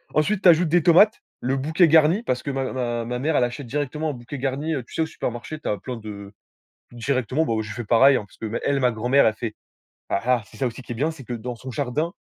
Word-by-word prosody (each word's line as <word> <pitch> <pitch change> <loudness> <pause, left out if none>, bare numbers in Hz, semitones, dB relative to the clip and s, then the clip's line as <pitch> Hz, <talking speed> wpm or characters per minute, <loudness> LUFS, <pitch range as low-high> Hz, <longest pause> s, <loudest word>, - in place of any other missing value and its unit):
Ensuite, 190 +6 +2
tu 180 - +8
ajoutes 165 0 +5
des 175 +1 +4
tomates, 190 +6 +5 0.2
le 130 +2 0
bouquet 160 +5 +3
garni, 160 +6 +5
parce 125 - -2
que 140 - -4
ma 135 -1 -2
ma 120 -2 -2
ma 125 +1 -3
mère, 150 +3 0
elle - - +3
achète 125 +1 -6
directement 150 +4 -2
un - - -3
bouquet 125 +4 -8
garni. 140 +4 -2
Heu, 130 - -3
tu - - -17
sais, - - 0
au - - +2
supermarché, 125 +2 -5
tu - - -7
as 105 - 0
plein 125 -2 -6
de 105 -2 -9 0.6
directement. 130 +5 -1
Bon, 110 -4 0
je 110 -1 -6
fais 120 - -5
pareil 130 +5 +5
parce 105 - -9
qu'elle, 115 +5 -1
ma 125 -2 +3
grand-mère, 125 +5 +3
elle 110 - +3
fait, 110 -1 -5 0.6
ah, 100 - +1
ah 125 -3 +3
c'est - - -16
ça 135 - 0
aussi 120 +2 -5
qui 120 - -7
est - - -4
bien, 150 +7 0
c'est 135 -5 -12
que 125 - -6
dans 120 +2 -5
son 130 +2 -8
jardin 145 +6 -2
130 Hz, 260 wpm, -23 LUFS, 120-155 Hz, 0.6 s, tu